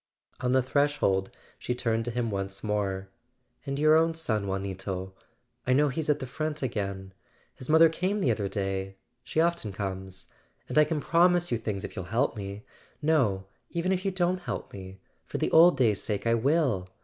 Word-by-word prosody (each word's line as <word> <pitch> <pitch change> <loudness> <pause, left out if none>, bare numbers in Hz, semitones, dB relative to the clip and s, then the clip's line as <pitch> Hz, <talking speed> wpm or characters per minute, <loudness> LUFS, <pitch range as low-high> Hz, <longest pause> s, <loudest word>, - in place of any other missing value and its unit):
On 125 -1 0
the 130 -1 +4
threshold 130 -8 +1 0.3
she 125 - -2
turned 115 -2 0
to - - -1
him 115 -1 -1
once 100 0 -4
more. 100 -3 -2 0.6
"And 140 0 -2
your 155 +1 +5
own 165 0 +3
son, 110 -11 -1
Juanito—I 95 +4 -5
know 145 +2 +4
he's 150 +3 -3
at 150 - +4
the 130 - -5
front 155 +3 -3
again. 100 -5 -3 0.4
His 130 - -10
mother 160 +1 +7
came 185 +6 -1
the 135 -11 +2
other 105 -3 -1
day—she 95 +7 -4
often 170 -10 +1
comes. 95 -1 -5 0.4
And - - +2
I 150 - +6
can 150 -1 -2
promise 175 +2 +3
you 120 - +1
things 105 -4 -4
if - - -7
you'll 95 - -5
help 115 +9 0
me. 100 0 -7 0.3
No, 130 -12 +1 0.2
even 170 +2 -1
if 185 -1 0
you 195 - +1
don't 185 -1 0
help - - -5
me—for 95 -1 -9
the - - -1
old 170 +2 +7
days' 110 -6 +2
sake, 105 0 -2
I 115 - +3
will! 120 - +1
120 Hz, 180 wpm, -28 LUFS, 95-155 Hz, 0.6 s, mother